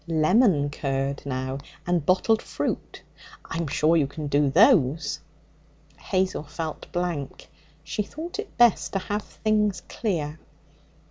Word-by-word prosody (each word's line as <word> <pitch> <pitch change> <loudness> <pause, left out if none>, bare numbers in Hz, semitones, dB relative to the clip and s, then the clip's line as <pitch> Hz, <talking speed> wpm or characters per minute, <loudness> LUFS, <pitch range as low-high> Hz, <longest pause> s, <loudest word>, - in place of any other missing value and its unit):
Lemon 165 - +3
curd, 135 0 -2
now, 130 0 -3 0.3
and 175 -3 +1
bottled 205 +7 +3
fruit. - - -4 0.4
I'm 165 -1 -3
sure 155 +4 +3
you 145 -4 +2
can 150 +2 -6
do 145 0 +2
those?' 160 - +4 0.8
Hazel 190 -3 0
felt 155 +1 -6
blank. 175 -6 -3 0.4
She 170 - -2
thought 320 - -6
it 425 - -7
best 240 -3 +4
to - - +1
have 205 +2 -2
things 210 -3 0
clear. 160 -8 -2
165 Hz, 125 wpm, -25 LUFS, 145-205 Hz, 0.8 s, those